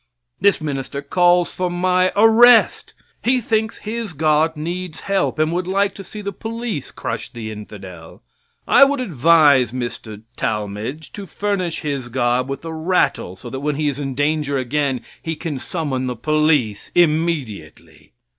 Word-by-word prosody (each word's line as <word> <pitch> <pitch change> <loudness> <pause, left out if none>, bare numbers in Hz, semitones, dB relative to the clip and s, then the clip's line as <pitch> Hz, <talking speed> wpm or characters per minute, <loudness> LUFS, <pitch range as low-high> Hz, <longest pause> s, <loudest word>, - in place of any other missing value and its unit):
This 200 +2 +3
minister 140 -2 -4
calls 175 +3 +3
for 180 -1 -2
my 185 +1 +1
arrest. 225 +2 +5 0.3
He 255 +1 +3
thinks 220 -1 -1
his 220 -3 -5
God 155 +1 +2
needs 170 +1 -5
help, 195 -4 0
and 155 +1 +1
would 180 +1 -2
like 195 +1 +1
to 195 - -9
see 210 +3 -9
the 200 0 -4
police 225 - -5
crush - - -5
the 110 -2 -6
infidel. 95 -6 -11 0.4
I - - +7
would 280 0 +3
advise 150 - +4
Mr. 120 -4 -6
Talmage 105 +6 -3
(hisses) 145 - -13
to 200 - -8
furnish 185 -2 -2
his 140 -5 -3
God 125 +1 0
with 135 +4 -5
a 165 - -5
rattle, 160 - 0
so 120 +5 -10
that 130 - -4
when 145 +1 -1
he 150 0 0
is 140 0 -5
in 135 -2 -4
danger 145 0 0
again 135 0 -1 0.2
he 165 0 -3
can 150 -4 -5
summon 135 -5 -3
the 125 - -3
police 150 -5 +1
immediately. 115 - -1
155 Hz, 160 wpm, -20 LUFS, 130-185 Hz, 0.4 s, I